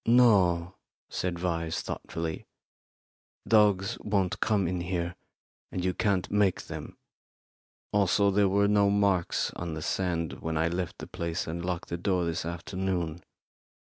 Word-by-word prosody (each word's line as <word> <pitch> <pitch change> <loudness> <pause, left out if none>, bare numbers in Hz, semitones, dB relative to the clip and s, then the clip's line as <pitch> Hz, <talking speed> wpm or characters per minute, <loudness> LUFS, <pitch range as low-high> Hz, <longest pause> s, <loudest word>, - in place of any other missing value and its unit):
"No," 95 -8 +5 0.4
said 90 -1 -1
Vyse, 85 -2 -1
thoughtfully. 80 -1 -4 1.0
"Dogs 105 -1 +3
won't 100 -3 0
come 100 -4 +2
in 90 0 -2
here, 85 -1 -2 0.6
and 90 -1 -2
you 90 - +1
can't 100 -3 0
make 100 -2 +2
them. - - -8 1.0
Also, 100 0 +3
there 100 0 +3
were 100 +1 +3
no 100 -1 +4
marks 100 -3 +2
on 85 -2 -4
the 80 - -5
sand 85 -4 -1
when 80 -1 -2
I 80 +1 +2
left 90 0 -3
the - - -7
place 85 +1 -3
and 85 +2 -4
locked 90 -1 -3
the 85 - -2
door 90 -1 +1
this 80 -1 -2
afternoon. 85 -1 -3
90 Hz, 140 wpm, -29 LUFS, 85-100 Hz, 1.0 s, No